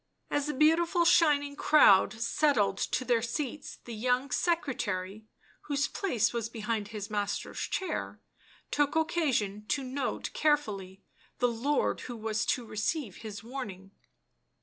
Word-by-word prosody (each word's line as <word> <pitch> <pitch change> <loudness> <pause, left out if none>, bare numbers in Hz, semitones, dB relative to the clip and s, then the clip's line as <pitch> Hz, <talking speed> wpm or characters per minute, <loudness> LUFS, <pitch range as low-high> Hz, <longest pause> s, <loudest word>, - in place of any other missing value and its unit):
As 290 0 0
the 300 - -2
beautiful 335 +4 +3
shining 290 -4 +4
crowd 205 -12 +6
settled 225 -2 +1
to 255 - -1
their 240 -2 +2
seats, 270 +4 -4
the 235 - -7
young 250 +4 0
secretary, 215 - -1 0.4
whose 280 -1 0
place 250 - 0
was 230 -1 -2
behind 220 -2 -3
his 210 -1 -6
master's 205 -1 -2
chair, 380 - -3 0.5
took 290 +1 +1
occasion 270 -11 0
to 275 - 0
note 260 0 -3
carefully 205 -11 0 0.3
the 245 - +3
lord 260 +5 0
who 240 -2 -7
was 220 0 -2
to 245 - 0
receive 215 - -2
his 215 -2 -8
warning. 215 -7 -7
245 Hz, 130 wpm, -30 LUFS, 215-290 Hz, 0.5 s, crowd